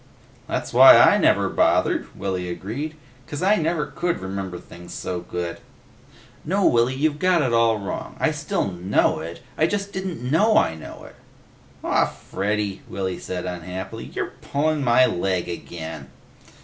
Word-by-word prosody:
"That's - - -3
why - - +10
I - - +6
never - - +3
bothered," - - +2
Willy 90 -2 -3
agreed. 120 - -5 0.3
"'Cause 145 +4 -5
I 205 +3 +4
never 160 -1 0
could 175 -1 -2
remember 95 -1 -5
things 85 0 -11
so 90 -1 -3
good." 85 0 -5 0.8
"No, 195 +4 +1
Willy. 120 +2 +3
You've 150 +2 0
got 180 -3 +3
it 125 -3 0
all 115 -1 +3
wrong. 100 -2 -6
I - - +2
still 100 - -2
know 90 -2 +1
it, 85 +2 -7 0.2
I 160 - +4
just 200 +1 -3
didn't 190 -8 -4
know 215 +8 +4
I - - +3
know 80 - -10
it." - - -14 0.7
"Aw, - - +2
Freddy," 100 0 -3
Willy 95 -2 -3
said 90 -1 -5
unhappily. 90 +1 -6
"You're - - -5
pullin' 150 +1 0
my 125 +1 +5
leg 90 -2 -1
again!" 80 -4 -7
105 Hz, 155 wpm, -23 LUFS, -, 0.8 s, why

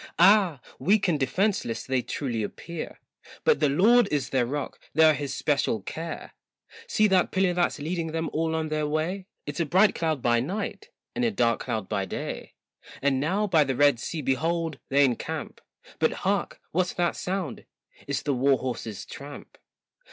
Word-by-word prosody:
Ah! 185 -5 +5 0.2
weak 205 +1 +3
and 160 -4 +1
defenceless 135 - 0
they 130 -1 +1
truly 120 -4 -3
appear, 165 +10 -6 0.4
But 470 -2 +4
the - - +3
Lord 215 - +5
is 135 -3 -1
their 125 -3 +2
rock, 145 +2 -4 0.2
they're 160 0 +7
his 145 -2 -3
special 130 -8 0
care. 165 +8 -6 0.5
See 215 - +3
that 185 -2 +3
pillar 190 -1 +2
that's 175 0 +1
leading 165 +2 -2
them 160 0 -2
all 160 +1 0
on 160 -1 -1
their 155 -1 0
way, 170 +6 -2 0.2
It's 145 +2 -5
a 170 - +2
bright 190 +6 +5
cloud 160 -5 -1
by 120 -1 +3
night 200 - -4 0.3
and 245 - 0
a 235 - +3
dark 120 - +1
cloud 110 -4 -3
by 95 - -1
day; - - -6 0.4
And 135 -1 +1
now 185 +9 +1
by 165 -6 +4
the 135 -2 -2
Red 145 -2 +4
Sea 155 +4 -4
behold 165 +4 0
they 140 +1 +5
encamp, 125 -3 -3 0.4
But - - +2
hark! - - 0
what's 180 +2 0
that 175 -1 0
sound, 180 -8 -4 0.4
it's 140 -1 -2
the 145 - 0
war 135 +1 +3
horse's 115 -5 -5
tramp. 145 +1 -10
155 Hz, 175 wpm, -26 LUFS, 135-180 Hz, 0.5 s, they're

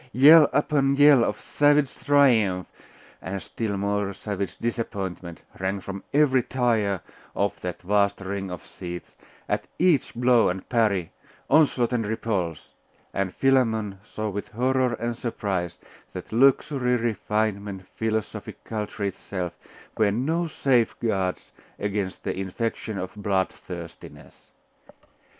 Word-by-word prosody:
Yell 150 +4 +8
upon 140 -2 +2
yell 145 -3 +7
of - - -1
savage 145 -1 +2
triumph, 115 -11 +3 0.6
and 95 +1 -4
still 105 0 -4
more 100 0 -1
savage 100 -1 -4
disappointment, 95 -7 -4 0.2
rang 95 +1 -1
from 95 +1 -7
every 140 -3 +4
tier 115 -7 0 0.3
of 100 -1 -1
that 90 0 -5
vast 100 +1 +2
ring 95 0 -4
of 90 -3 -7
seats, 90 -1 -8 0.3
at - - -1
each 170 -7 +2
blow 120 -1 +4
and 90 +1 -4
parry, 105 -8 +1 0.4
onslaught 135 -5 +4
and 115 -3 0
repulse; 100 -7 -3 0.4
and 95 -1 -1
Philammon 110 -7 +2
saw 110 0 -5
with 100 0 -4
horror 130 +1 +1
and 120 +1 -3
surprise 100 -7 -3 0.4
that - - -8
luxury, 130 0 +3
refinement, 105 -4 -2
philosophic 110 -1 -4
culture 105 -1 -4
itself, 95 -2 -4 0.4
were 110 -2 +4
no 160 +10 0
safeguards 115 - 0 0.3
against 100 -2 -3
the - - -2
infection 100 +3 -3
of 95 -1 -5
bloodthirstiness. 95 -4 -5
110 Hz, 120 wpm, -25 LUFS, 95-125 Hz, 0.6 s, Yell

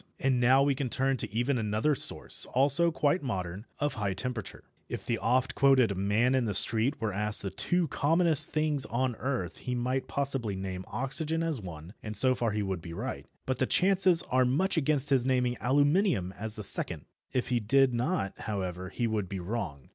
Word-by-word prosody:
And 130 -2 +1
now 130 +3 +5
we 140 0 +2
can 135 -1 -3
turn 135 +2 0
to - - -5
even 120 +4 0
another 110 +7 0
source, - - 0
also 140 +6 +4
quite 155 +1 +1
modern, 95 -4 -5
of 145 0 -1
high 100 -3 -2
temperature. 120 -2 -5 0.3
If - - -6
the - - -1
oft 125 +2 +1
quoted 130 -7 +3
"man 105 +7 +1
in 130 -2 +1
the 105 -3 -2
street" 115 +7 +1
were 110 -3 -2
asked 105 +1 +2
the 95 - -3
two 175 - 0
commonest 160 +2 +2
things 155 -3 0
on 125 0 -1
earth 125 -9 -3
he 125 - -4
might 125 +2 -2
possibly 135 -7 -2
name 95 -1 -5
oxygen 150 +7 -2
as 160 -8 -2
one, 85 -1 -9
and 105 -1 -4
so 130 -1 +4
far 120 -2 -1
he 105 0 -2
would 95 -3 -3
be 85 0 -8
right, - - -5 0.2
but 130 -1 -2
the 130 - +1
chances 185 -2 +5
are 130 0 +4
much 150 +11 +1
against 145 -2 0
his 130 -3 +3
naming 125 -1 +1
aluminium 145 - +2
as 110 0 -4
the 105 - -3
second. - - 0 0.3
If 130 -1 -2
he 125 -1 +1
did 130 +4 +3
not, 120 - -1
however, 95 -4 -4
he 120 +5 -2
would 105 -5 -2
be 95 - -4
wrong. 90 - -5
125 Hz, 200 wpm, -29 LUFS, 105-140 Hz, 0.3 s, now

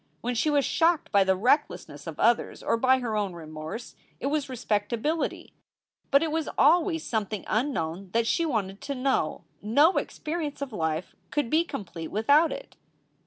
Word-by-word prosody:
When 245 +1 -1
she 245 +6 +1
was 285 -2 +2
shocked 330 0 +2
by 200 -1 +5
the 190 0 +2
recklessness 210 - 0
of 160 - -7
others 235 +1 +2
or - - +2
by 260 +3 +4
her 225 -3 -2
own 205 -3 -1
remorse, 155 +6 -8 0.2
it - - -5
was 295 -2 -1
respectability. 235 +5 -2 0.6
But 280 +2 +5
it 320 - -1
was 320 0 -1
always 325 +2 +4
something 215 -3 -2
unknown 195 - -1
that 230 0 +2
she 335 - +1
wanted 210 - -2
to 280 - -4
know. 255 - 0 0.2
No 285 - +4
experi 325 -1 -3
ence 290 - -6
of 280 -4 -5
life 160 -2 -2
could 290 -6 -1
be 320 +2 +4
complete 190 - -6
without 285 +10 +4
it. - - -8
240 Hz, 170 wpm, -27 LUFS, 200-295 Hz, 0.6 s, by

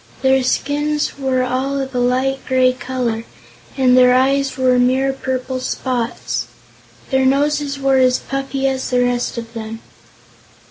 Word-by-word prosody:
Their 265 0 +4
skins 290 +3 -1
were 260 -2 0
all 265 +2 -1
of 270 0 -4
a 250 - -1
light 260 +2 +1
gray 255 -1 +3
color, 250 -3 -3 0.5
and 255 -2 +4
their 250 0 +6
eyes 270 +1 +1
were 255 -1 +3
mere 260 +2 +2
purple 260 -1 -3
spots. 240 - -3 0.6
Their 265 0 +2
noses 285 +1 +1
were 270 -1 +2
as 255 -1 +4
puffy 275 0 -3
as 265 -1 -2
the 250 -1 +2
rest 245 0 -1
of 230 0 -7
them. 225 -1 -6
260 Hz, 145 wpm, -18 LUFS, 250-270 Hz, 0.6 s, their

